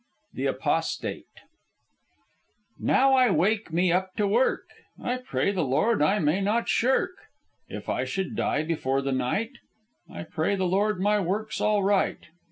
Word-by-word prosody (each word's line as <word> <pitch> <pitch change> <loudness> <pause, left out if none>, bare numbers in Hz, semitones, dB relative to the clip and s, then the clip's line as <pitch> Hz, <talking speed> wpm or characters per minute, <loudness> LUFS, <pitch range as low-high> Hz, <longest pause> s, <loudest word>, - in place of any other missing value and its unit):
THE - - -2
APOSTATE - - -2 1.5
"Now 270 +1 +3
I 255 -2 +5
wake 200 +3 +1
me 175 +2 +2
up 185 +1 -1
to 210 - +1
work; 235 +6 +2 0.4
I 250 +1 -2
pray 200 - -1
the 185 -4 -1
Lord 155 - +1
I 175 +8 +3
may 165 +1 +1
not 215 +4 0
shirk. 265 +10 +2 0.6
If - - -8
I - - -1
should 190 -2 -3
die 150 - 0
before 135 -4 -1
the 135 - -1
night, 130 - -1 0.6
I - - -7
pray 160 +4 -1
the 190 -1 -1
Lord 200 +2 +1
my 205 +2 +2
work's 205 +4 -2
all 210 -2 +2
right. 195 0 +1
195 Hz, 155 wpm, -26 LUFS, 160-215 Hz, 1.5 s, I